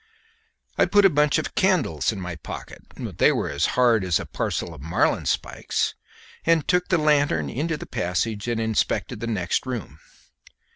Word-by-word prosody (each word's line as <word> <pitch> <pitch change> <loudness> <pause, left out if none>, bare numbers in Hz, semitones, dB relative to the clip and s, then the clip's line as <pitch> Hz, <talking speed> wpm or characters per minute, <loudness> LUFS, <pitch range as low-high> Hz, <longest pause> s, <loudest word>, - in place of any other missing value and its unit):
I - - +6
put 205 -1 +4
a 195 - +6
bunch 150 0 +3
of - - -3
candles 155 - +1
in 105 - -6
my 90 -2 -5
pocket 75 - -9 0.2
they - - +2
were - - -1
as 70 +4 +1
hard 120 -5 +4
as 90 -2 +1
a - - -5
parcel 85 - -3
of 75 - -12
marline 80 +4 +1
spikes - - -1 0.5
and 165 -2 +2
took 180 0 +2
the 185 - +2
lanthorn 145 - +2
into 155 +5 -2
the - - -8
passage 100 +5 -2
and 120 -1 -1
inspected 110 -2 -1
the 115 - -4
next 100 +1 -1
room. 110 - -5
115 Hz, 175 wpm, -24 LUFS, -, 0.5 s, I